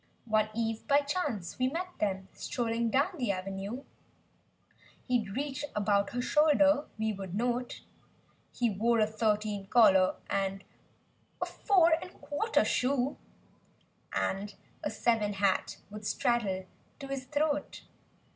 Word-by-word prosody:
8i - - -13
One 215 0 +3
eve 225 -1 -2
(by 285 +1 +5
chance) 280 - -3
we 255 - +3
met 345 +7 -3
them, 190 -2 -1
strolling 230 -1 -1
down 275 +9 +3
the 240 -5 +1
avenue; 195 +6 -4 1.2
He'd 225 -6 0
reach 285 +1 -3
about 200 -1 +2
her 245 - -1
shoulder, 295 0 +4
we 220 0 0
would 190 -2 -6
note 245 +2 -1 0.7
He 245 - 0
wore 230 +4 +2
a 215 - +5
thirteen 215 -2 -1
collar 190 -5 +5
and 195 0 -1 0.8
a - - 0
four'n' 340 -5 +3
a - - -7
quarter 395 +8 0
shoe. 260 +1 +1 0.9
And 200 +1 -2 0.3
a - - 0
seven 220 -3 +1
hat 195 -1 +1
would 210 0 -6
straddle 205 -6 0 0.3
to 275 - -8
his 270 -1 -4
throat. 295 +1 -1
230 Hz, 130 wpm, -31 LUFS, 200-275 Hz, 1.2 s, by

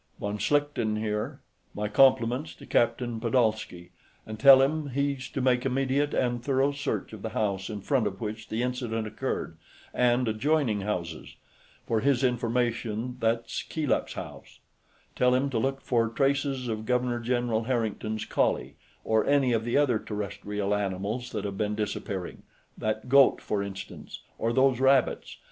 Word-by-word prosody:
"Von 100 +1 -3
Schlichten 135 -4 +1
here; 105 -1 -3 0.3
my 105 0 -2
compliments 125 +4 +3
to - - -13
Captain 120 0 +1
Pedolsky, 110 -7 0 0.3
and 110 0 -7
tell 135 0 +9
him 150 +1 -1
he's 140 -1 -2
to 135 - -3
make 125 -1 +2
immediate 135 +2 0
and 120 -1 0
thorough 135 +1 +2
search 140 -4 -3
of 110 - -8
the 110 - -4
house 100 -3 -1
in 105 -2 -5
front 120 +1 +1
of 95 -1 -6
which 110 0 -5
the 115 +2 -1
incident 120 -3 -2
occurred, 110 - -4 0.4
and 125 0 +2
adjoining 115 -1 +1
houses. 85 -5 -4 0.5
For 115 - +1
his 135 +2 +2
information, 120 -1 -1
that's 115 0 -1
Keeluk's 155 -4 -1
house. - - -9 0.6
Tell 125 0 +3
him 135 +2 0
to 115 - 0
look 135 +3 -1
for 115 -2 +1
traces 135 +1 0
of 110 -1 -4
Governor 125 -1 +1
General 120 -2 0
Harrington's 110 -3 -2
collie, - - 0 0.3
or 110 -1 +2
any 140 -3 +3
of 115 -1 +1
the 120 +3 +1
other 130 -7 +3
terrestrial 105 -1 -3
animals 105 +5 -2
that 105 -3 -3
have 100 -1 -5
been 105 0 0
disappearing 100 -3 -4 0.3
that 110 +2 -3
goat, 140 +1 +6
for 105 -2 -2
instance, 100 -1 -8 0.2
or 115 - 0
those 130 0 +3
rabbits. 135 0 +2
120 Hz, 155 wpm, -27 LUFS, 110-130 Hz, 0.6 s, tell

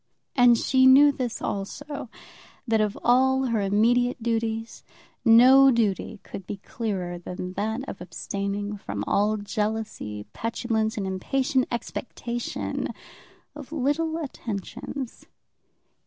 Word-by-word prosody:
And 245 -2 +6
she 260 +2 +4
knew 285 +3 +8
this 250 -4 -4
also, 280 +7 -4 0.6
that 225 -1 +3
of 210 -1 -1
all 265 +2 +4
her 230 -4 0
immediate 235 +5 +2
duties, 225 -1 -2 0.4
no 255 +4 +8
duty 220 -3 0
could 190 - -9
be 205 - -4
clearer 190 -5 -4
than 180 +1 -6
that 220 +7 -2
of - - -7
abstaining 200 +3 -4
from 100 - -4
all 210 +2 +2
jealousy, 210 - -3
petulance, 225 -1 -1
and 200 - -2
impatient 255 +8 0
expectation 235 0 -4 0.7
of 290 -1 -10
little 315 +3 0
attentions. 255 - -6
225 Hz, 110 wpm, -25 LUFS, 205-255 Hz, 0.7 s, knew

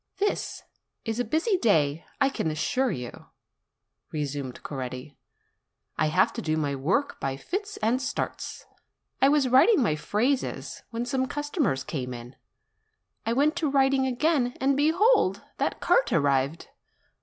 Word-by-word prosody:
"This 410 +1 -2 0.4
is 225 0 -2
a - - +2
busy 325 - +1
day, 160 - +2 0.2
I 275 -1 +4
can 165 - -2
assure 160 +12 0
you," 125 - -6 0.8
resumed 145 -4 -4
Coretti; 130 0 -6 0.8
"I 155 - +1
have 155 - +3
to - - -4
do 155 0 0
my 145 -2 0
work 170 - 0
by 135 0 -2
fits 405 - -4
and 240 +4 +2
starts. 270 - -4 0.6
I 270 - +6
was 290 -2 +3
writing 265 - +5
my 155 -9 +1
phrases, 240 - -1
when 235 +1 -3
some 260 +1 0
customers 290 - -1
came 125 -5 -4
in. 120 +2 -10 0.9
I 230 - +2
went 295 +5 +2
to 315 -4 +1
writing 270 -1 +3
again, 260 -1 +1
and 270 +1 +2
behold! 320 - +3 0.2
that - - -1
cart - - +3
arrived. 140 +1 +1
240 Hz, 145 wpm, -27 LUFS, -, 0.9 s, I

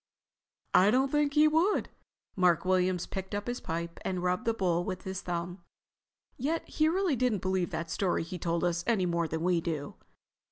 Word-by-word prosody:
"I 190 +3 +6
don't 265 +4 +2
think 295 -1 +1
he 305 +1 +6
would." 325 +7 +2 0.5
Mark 180 -2 +3
Williams 185 -1 +2
picked 190 0 -5
up 205 0 -3
his 245 +1 -4
pipe 170 +1 -4
and 185 -1 -2
rubbed 180 0 0
the 230 - +2
bowl 175 -4 +1
with 185 0 -5
his 190 -1 -4
thumb. 175 0 -4 0.8
"Yet 310 +6 -1
he 310 - +1
didn't 325 - +1
really 375 -6 +2 0.2
believe 185 -1 -1
that 165 0 -4
story 180 0 0
he 175 +2 -7
told 170 0 -1
us 175 -1 0
any 215 -6 +2
more 170 -1 0
than 160 +1 -3
we 175 -1 +2
do." 155 -4 -4
185 Hz, 190 wpm, -30 LUFS, 170-230 Hz, 0.8 s, I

